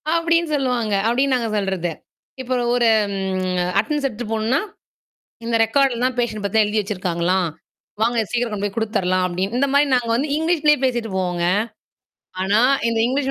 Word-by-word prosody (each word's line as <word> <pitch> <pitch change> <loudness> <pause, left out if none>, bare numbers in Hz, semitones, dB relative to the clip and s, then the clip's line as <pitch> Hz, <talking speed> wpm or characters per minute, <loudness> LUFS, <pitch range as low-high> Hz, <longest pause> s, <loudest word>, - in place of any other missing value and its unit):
அப்பிடின்னு 335 -1 +1
சொல்லுவாங்க. 250 -6 -1
அப்பிடின்னு 260 +3 +2
நாங்க 235 -3 -1
சொல்றது. 190 -4 -1 0.5
இப்ப 255 0 -3 0.2
ஒரு 240 -1 +3 0.2
ம் 185 -2 -1
அட்டனன்ஸ் 290 +7 -1
எடுத்துட்டு 225 -2 -7
போணுனா. 225 +5 +1 0.9
இந்த 230 0 0
ரெக்கார்ட்லாம் 255 +1 +1
பேஷன்ட் 225 -4 -2
பத்திலாம் 215 +2 +3
எழுதி 210 +1 0
வச்சிருக்காங்களாம். 180 -2 -1 0.5
வாங்க 235 +1 +1
சீக்கிரம் 240 -2 -1
கொண்டு 205 -1 -3
போய் 200 - -7
குடுத்துர்லாம் 190 -5 0
அப்பிடின்னு. 185 +5 -2
இந்தமாரி 280 +2 +3
நாங்க 245 -2 0
வந்து 270 +6 0
இங்கிலீஷ்லயே 310 -2 +2
பேசிட்டு 240 -4 -1
போவோங்க. 180 -2 -1 1.0
ஆனா, 200 +4 +2 0.3
இந்த 230 - 0
இங்கிலீஷ் 270 +2 -1
225 Hz, 145 wpm, -21 LUFS, 195-260 Hz, 1.0 s, ஒரு